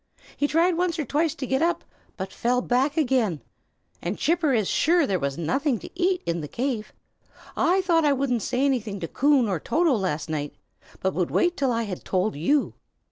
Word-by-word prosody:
He 290 - +1
tried 335 +3 +2
once 355 -1 0
or 305 - -2
twice 305 +2 0
to 270 - -4
get 265 +2 0
up, 340 +1 +1 0.3
but 190 -1 -5
fell 250 +1 +1
back 265 +5 +1
again; 245 - +1 0.6
and - - -3
Chipper 325 -2 +1
is 220 -6 +1
sure 340 0 +3
there 195 -7 0
was 140 -2 -2
nothing 240 - 0
to - - -10
eat 360 0 0
in 170 0 -1
the 150 - -5
cave. 235 - -3 0.6
I 370 +3 +3
thought 340 -3 +2
I 295 - +4
wouldn't 260 -4 0
say 255 +5 0
anything 225 -7 -1
to 165 - -3
Coon 275 - +3
or 185 -5 -1
Toto 325 - +2
last 180 -9 -1
night, 150 -2 -4 0.5
but 190 - 0
would 180 -2 -1
wait 355 0 +2
till 270 -3 +1
I 230 -1 0
had 195 -5 -6
told 190 +1 0
you." 275 - +1
260 Hz, 200 wpm, -25 LUFS, 195-310 Hz, 0.6 s, I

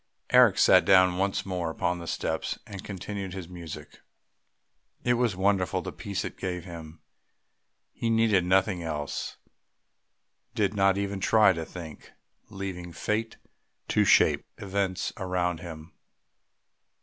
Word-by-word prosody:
Eric - - +6
sat - - +6
down 95 -1 +5
once 100 0 0
more 90 -3 -2
upon 85 +2 -1
the 85 - -8
steps - - -2
and 100 -2 -8
continued 100 -1 -6
his 95 -3 -6
music. 80 -4 -9 1.0
It 120 - +3
was 120 -4 +1
wonderful 95 -1 +1
the - - -5
peace 100 -1 -4
it - - -7
gave 90 -2 -4
him; 80 -3 -10 0.9
he 115 - -2
needed 110 -4 +3
nothing 95 0 +2
else 75 -3 -4 1.2
did 100 -2 +1
not 100 -1 +3
even 100 -1 -2
try 105 -1 +5
to 80 -2 -4
think, 80 -4 -10 0.4
leaving 95 -3 -6
Fate 110 +6 -2 0.5
to - - +3
shape - - +4
events 95 -1 -2
around 90 -3 -1
him. 80 -1 -9
95 Hz, 130 wpm, -27 LUFS, 85-100 Hz, 1.2 s, Eric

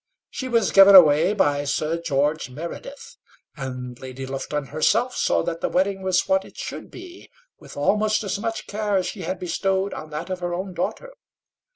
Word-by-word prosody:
She 260 - -5
was 230 -5 +1
given 195 0 +8
away 165 +1 +7
by 145 -7 +1
Sir 155 +3 -1
George 150 -1 0
Meredith, 170 - -9 0.4
and 125 -3 -6
Lady 130 0 -7
Lufton 135 +2 -4
herself 235 +11 +1
saw - - +1
that 165 -1 -4
the - - 0
wedding 195 +1 0
was 185 -1 +1
what 285 0 +2
it - - -16
should - - -7
be, 360 0 -12 0.3
with - - -13
almost 210 +9 +1
as 200 0 -3
much 225 0 -4
care 205 -1 -1
as 185 - 0
she 200 - -5
had 190 - -3
bestowed 190 +2 -1
on 155 - -8
that 155 +5 -6
of 185 - -3
her 175 -1 -3
own 185 +1 -5
daughter. - - -4
180 Hz, 185 wpm, -23 LUFS, 150-205 Hz, 0.4 s, given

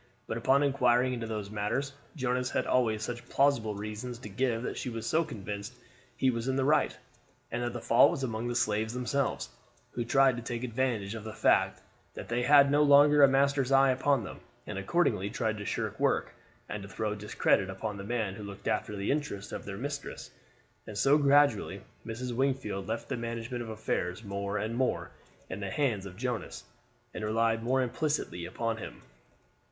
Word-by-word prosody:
But - - -4
upon 135 +4 +3
inquiring 130 -2 +3
into 115 -2 -4
these 105 -2 -4
matters, 105 +7 -2 0.2
Jonas 125 -2 0
had - - -1
always 110 -4 +1
such 120 +1 -6
plausible 125 -7 +2
reasons 105 +4 -5
to 110 -3 -9
give 115 +2 0
that - - -3
she - - -4
was 115 -1 -4
convinced 105 - -2 0.4
he 130 - +3
was 115 +1 -3
in 130 - +1
the 135 -1 +1
right, 150 +2 +2 0.5
and 120 - -2
that 120 -1 -2
the 120 - -5
fault 115 - +6
was 135 - -3
among 115 -1 -2
the 120 - -2
slaves 110 0 0
themselves, 125 - -1 0.4
who 120 - -2
tried 130 +1 +4
to - - -4
take 120 +1 -4
advantage 115 -4 -1
of 110 -2 -6
the 110 -1 -7
fact - - +2 0.3
that - - -8
they 120 +1 0
had 140 +2 +6
no 145 +1 +4
longer 145 0 +7
a 140 - +9
master's 135 0 +2
eye 135 0 +6
upon 135 -1 +2
them, 90 - -8 0.3
and 95 - -4
accordingly 100 - +1
tried 110 -2 -2
to 105 - -6
shirk - - -3
work, - - +1 0.3
and 105 - -5
to 100 - -9
throw 105 0 -2
discredit 105 -2 +1
upon 100 +2 -4
the 100 - -6
man 110 -2 -2
who 105 +1 -8
looked 100 -1 -8
after 105 -1 -1
the 100 0 -1
interests 140 -9 -3
of - - -6
their 95 -1 -6
mistress; 140 +3 -5 0.6
and 105 - -7
so 135 +8 +5
gradually 140 -5 +3 0.3
Mrs. 120 +2 -4
Wingfield 125 -7 -1
left 115 +1 -3
the - - -3
management 115 +1 -4
of 115 - -6
affairs 110 -2 -2
more 100 0 -3
and 110 +2 -2
more 130 +1 -1 0.4
in 90 - -6
the 100 -1 -4
hands 110 -7 0
of 90 -1 -11
Jonas, 120 -4 -4 0.5
and - - -5
relied 115 +1 +1
more 130 +3 +2
implicitly 125 - -2
upon 115 +4 -2
him. - - -9
115 Hz, 190 wpm, -30 LUFS, 105-130 Hz, 0.6 s, a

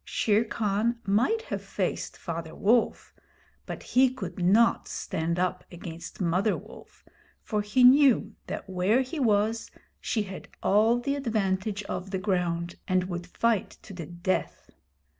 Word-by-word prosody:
Shere 215 +1 +1
Khan 220 +2 0
might 245 - +2
have - - -5
faced - - -3
Father 165 -2 -6
Wolf, 230 +3 +1 0.5
but - - -6
he 260 +1 +4
could 260 -5 -6
not 220 +6 +4
stand 165 +2 -2
up 180 0 -1
against 170 -1 -8
Mother 185 +4 +1
Wolf, - - -14 0.4
for 210 -2 -1
he 210 +5 +2
knew 255 -4 +6
that - - -5
where 190 +6 +2
he 265 +5 -4
was 225 -1 +1 0.3
she 215 - -1
had 190 -2 -8 0.2
all 220 +4 +4
the 280 +3 -1
advantage 210 -6 -1
of 190 -1 -5
the 190 - -2
ground, 175 -3 -1
and 185 -1 +2
would 175 0 -5
fight 225 +2 0
to 200 - -10
the 170 -4 -7
death. 175 +2 -3
205 Hz, 145 wpm, -27 LUFS, 180-230 Hz, 0.5 s, knew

